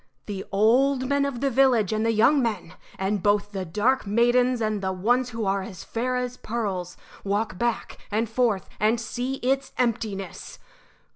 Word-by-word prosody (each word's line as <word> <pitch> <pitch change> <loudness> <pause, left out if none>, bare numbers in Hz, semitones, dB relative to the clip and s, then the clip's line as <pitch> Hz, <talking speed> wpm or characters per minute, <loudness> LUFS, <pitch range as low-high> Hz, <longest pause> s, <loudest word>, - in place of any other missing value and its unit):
The 195 -2 -5
old 255 +6 +3
men 280 +1 +2
of 270 -4 -4
the 275 -1 +1
village 245 -6 +3
and 215 0 0
the 230 - +2
young 235 +6 +4
men, 220 -8 -2 0.2
and 195 +1 -1
both 205 0 +1
the 190 -2 -4
dark 210 +8 +1
maidens 240 +3 +3
and 215 -2 -1
the 190 -1 -1
ones 240 +7 +1
who 230 -2 -4
are 195 0 +1
as 190 -2 -8
fair 250 +2 -2
as 250 0 -3
pearls 195 -6 -4 0.3
walk 200 -1 -1
back 235 -1 -2
and 220 +2 0
forth 220 -6 0
and 220 +3 +2
see 245 +3 -3
its 270 +1 0
emptiness. 220 -6 -2
225 Hz, 170 wpm, -25 LUFS, 205-250 Hz, 0.3 s, young